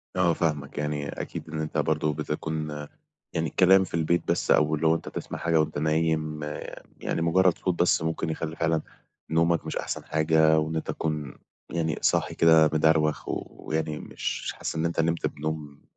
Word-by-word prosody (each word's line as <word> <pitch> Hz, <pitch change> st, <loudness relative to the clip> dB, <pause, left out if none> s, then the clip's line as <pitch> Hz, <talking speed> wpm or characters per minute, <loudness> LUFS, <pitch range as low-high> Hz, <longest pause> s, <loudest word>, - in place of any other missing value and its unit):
آه 90 Hz, -2 st, +3 dB
فاهمك، 75 Hz, -4 st, -2 dB
يعني 75 Hz, -1 st, -2 dB
أكيد -, -, -6 dB
إن 80 Hz, 0 st, -3 dB
أنت 75 Hz, -, -3 dB
برضه 75 Hz, -1 st, +1 dB
بتكُون 75 Hz, +1 st, -3 dB, 0.6 s
يعني 80 Hz, 0 st, 0 dB
الكلام 95 Hz, +3 st, +5 dB
في 90 Hz, -, -9 dB
البيت 85 Hz, +1 st, +1 dB
بس -, -, +1 dB
أو 75 Hz, 0 st, +4 dB
اللي 80 Hz, +2 st, +1 dB
هو 80 Hz, -, +5 dB
أنت -, -, -5 dB
تسمَع -, -, -6 dB
حاجة 85 Hz, -1 st, +2 dB
وأنت 80 Hz, -1 st, 0 dB
نايم 80 Hz, 0 st, 0 dB, 0.6 s
يعني 80 Hz, -, -2 dB
مجرّد 90 Hz, +2 st, +3 dB
صوت 90 Hz, -2 st, -2 dB
بس 90 Hz, -, +3 dB
ممكن 80 Hz, 0 st, -2 dB
يخلّي 80 Hz, 0 st, -3 dB
فعلًا 80 Hz, -1 st, +1 dB, 0.5 s
نومك 85 Hz, 0 st, +2 dB
مش 80 Hz, -, -3 dB
أحسن -, -, -4 dB
حاجة 80 Hz, 0 st, +3 dB
وإن 80 Hz, +1 st, -2 dB
أنت 80 Hz, -, -3 dB
تكُون 75 Hz, -3 st, -3 dB, 0.4 s
يعني 80 Hz, -2 st, -1 dB
صاحي -, -, +1 dB
كده 80 Hz, -2 st, +6 dB
مدروَخ 80 Hz, 0 st, +3 dB
ويعني 80 Hz, -1 st, -3 dB
مش -, -, -4 dB
حاسس -, -, -4 dB
إن 80 Hz, +1 st, 0 dB
أنت 85 Hz, 0 st, -1 dB
نِمت 85 Hz, +1 st, +1 dB
بنوم 75 Hz, -1 st, -5 dB
80 Hz, 175 wpm, -26 LUFS, 75-80 Hz, 0.6 s, كده